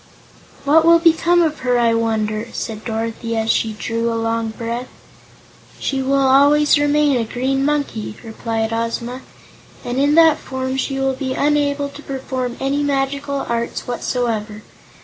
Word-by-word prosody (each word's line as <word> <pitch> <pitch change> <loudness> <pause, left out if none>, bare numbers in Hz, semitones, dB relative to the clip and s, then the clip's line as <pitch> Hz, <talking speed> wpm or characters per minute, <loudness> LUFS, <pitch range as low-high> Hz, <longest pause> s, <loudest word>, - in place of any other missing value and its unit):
"What 310 +3 +5
will 335 +1 +7
become 335 +1 +3
of 310 -3 -1
her, 250 -1 +1
I 235 -1 +3
wonder?" 220 -1 -1
said 220 -1 -5
Dorothy, 230 0 -3
as 225 0 +1
she 220 -1 0
drew 230 +2 -2
a 230 - -1
long 225 0 -1
breath. 235 +2 -5 0.9
"She 270 -1 -1
will 270 +1 +1
always 290 +2 +5
remain 290 -1 +3
a 235 - 0
Green 260 +4 -1
Monkey," 280 -8 -2
replied 225 0 -3
Ozma, 235 +2 -3 0.6
"and 245 +2 -2
in 290 +2 +3
that 325 -2 +6
form 260 0 -4
she 270 0 -2
will 270 0 +1
be 260 0 -3
unable 285 -1 +1
to 280 +1 -11
perform 260 -3 -4
any 275 +2 0
magical 280 0 -1
arts 235 0 -3
whatsoever. 225 -3 -2
260 Hz, 150 wpm, -19 LUFS, 230-285 Hz, 0.9 s, will